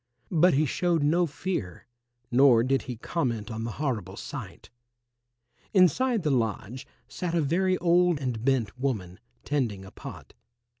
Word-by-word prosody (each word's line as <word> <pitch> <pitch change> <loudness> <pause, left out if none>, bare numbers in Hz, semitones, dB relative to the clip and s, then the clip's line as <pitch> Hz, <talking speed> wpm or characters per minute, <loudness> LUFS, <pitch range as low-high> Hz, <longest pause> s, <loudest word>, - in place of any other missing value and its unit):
But 175 -2 +4
he 155 +3 +3
showed 170 +2 0
no 170 +4 +3
fear 145 - -4 0.5
nor 125 -2 +6
did 135 +2 +1
he 125 - -3
comment 115 -4 -2
on 110 +1 -4
the 115 - -4
horrible 110 - -3
sight. - - -8 1.0
Inside 210 - +3
the 150 - +1
lodge 120 +1 -2 0.2
sat 175 -2 -4
a 170 - +3
very 185 +5 +1
old 175 -2 +3
and 125 -5 -3
bent 125 -6 +1
woman, 105 -10 -3 0.2
tending 115 -10 -2
a 95 - -12
pot. - - -10
135 Hz, 145 wpm, -27 LUFS, 115-170 Hz, 1.0 s, nor